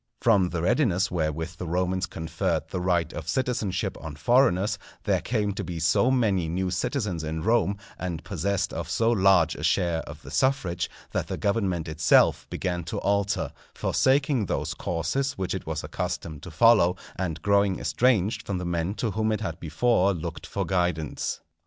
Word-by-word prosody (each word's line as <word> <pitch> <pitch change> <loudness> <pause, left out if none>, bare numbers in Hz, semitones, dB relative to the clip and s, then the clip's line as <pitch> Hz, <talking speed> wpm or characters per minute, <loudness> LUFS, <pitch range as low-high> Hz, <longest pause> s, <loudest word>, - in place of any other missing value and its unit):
From 100 -6 +4
the 85 -2 -3
readiness 95 - +2
wherewith 80 0 -2
the 90 - -5
Romans 90 +2 0
conferred 80 -1 -2
the 90 - -2
right 90 -2 +1
of 80 - -6
citizenship 120 -2 -1
on 80 -2 -7
foreigners, 100 - +3 0.2
there - - +1
came 105 -4 -1
to - - -4
be 85 -2 -5
so 85 +9 +3
many 105 -10 +2
new 90 +2 -1
citizens 100 - -2
in 80 +1 -3
Rome, 110 -2 +2 0.2
and 85 -3 -4
possessed 95 +2 -1
of 80 -1 -4
so 115 +5 +2
large 95 -7 +4
a - - -8
share 85 -2 +1
of - - -10
the - - -10
suffrage, 100 -10 0 0.2
that - - -1
the - - -3
government 95 -5 0
itself 80 0 +3
began 90 -2 -2
to 80 - -4
alter, 100 0 0 0.2
forsaking 135 -5 +2
those - - -2
courses 90 - -1
which 95 -9 -3
it - - -5
was - - -3
accustomed 80 -4 -4
to 90 - -8
follow, 90 0 +5 0.2
and 85 -4 -3
growing 100 -2 +3
estranged 115 -5 +1
from 100 - -1
the 90 - -4
men 85 +3 -1
to 110 0 -1
whom 110 +2 0
it 110 -1 -1
had 85 -6 -4
before 95 +4 +2
looked 85 0 -6
for - - -2
guidance. 90 -5 -1
95 Hz, 175 wpm, -26 LUFS, 85-105 Hz, 0.2 s, follow